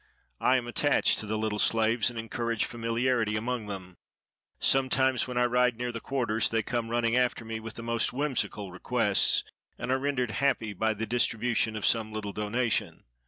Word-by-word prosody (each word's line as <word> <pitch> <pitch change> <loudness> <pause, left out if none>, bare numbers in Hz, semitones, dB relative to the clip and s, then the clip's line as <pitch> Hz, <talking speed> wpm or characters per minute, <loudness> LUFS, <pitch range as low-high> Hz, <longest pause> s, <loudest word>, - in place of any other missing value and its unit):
I 130 - +4
am 125 - -3
attached 140 +4 +2
to 110 - -4
the 110 +1 -1
little 110 -1 -2
slaves, 115 +1 +3
and 120 - -9
encourage 115 0 -2
familiarity 115 -1 0
among 115 0 -2
them. 95 -3 -8 0.6
Sometimes, 130 -1 +3
when 125 -1 -4
I 125 - +4
ride 125 -1 +2
near 125 0 -3
the 115 - -5
quarters, 115 -4 0
they 115 -1 0
come 120 0 -2
running 115 0 +1
after 125 -2 +1
me 110 0 -4
with 110 0 -8
the 115 - -7
most 115 -1 +1
whimsical 125 -8 -2
requests, 105 +2 +2 0.3
and - - -3
are 130 - +2
rendered 130 -4 -1
happy 115 -5 0
by 110 +3 0
the 110 +2 -3
distribution 115 -1 0
of 105 - -2
some 110 -2 +2
little 105 -2 -5
donation. 110 +3 -1
115 Hz, 180 wpm, -28 LUFS, 110-125 Hz, 0.6 s, I